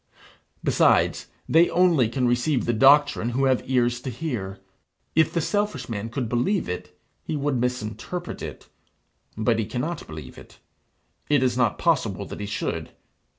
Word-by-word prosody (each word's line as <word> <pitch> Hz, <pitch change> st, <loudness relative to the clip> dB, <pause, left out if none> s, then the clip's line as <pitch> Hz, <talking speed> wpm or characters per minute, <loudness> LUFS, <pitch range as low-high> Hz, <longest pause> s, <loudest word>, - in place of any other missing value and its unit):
Besides, -, -, +3 dB, 0.2 s
they 165 Hz, +2 st, +5 dB
only 170 Hz, -10 st, +3 dB
can 125 Hz, +1 st, 0 dB
receive 125 Hz, +3 st, +1 dB
the 120 Hz, -, +1 dB
doctrine 140 Hz, 0 st, +5 dB
who 135 Hz, -, +2 dB
have 130 Hz, -2 st, +3 dB
ears 120 Hz, -2 st, +2 dB
to 130 Hz, -, -4 dB
hear. 120 Hz, -8 st, -4 dB, 0.6 s
If 160 Hz, -1 st, +3 dB
the 170 Hz, -, 0 dB
selfish 205 Hz, -, -1 dB
man 110 Hz, 0 st, -4 dB
could 120 Hz, 0 st, -3 dB
believe 125 Hz, -, 0 dB
it, 90 Hz, 0 st, -6 dB, 0.2 s
he -, -, -3 dB
would 140 Hz, -3 st, 0 dB
misinterpret 125 Hz, +8 st, -4 dB
it; -, -, -8 dB, 0.7 s
but 110 Hz, +1 st, +1 dB
he 110 Hz, -, 0 dB
cannot 155 Hz, +8 st, -4 dB
believe 75 Hz, -4 st, -9 dB
it. -, -, -16 dB, 0.7 s
It 145 Hz, -3 st, +3 dB
is 125 Hz, -2 st, +1 dB
not 120 Hz, -4 st, +1 dB
possible 125 Hz, -, 0 dB
that -, -, -8 dB
he 105 Hz, -, -4 dB
should. 105 Hz, -, -3 dB
125 Hz, 155 wpm, -24 LUFS, 115-150 Hz, 0.7 s, they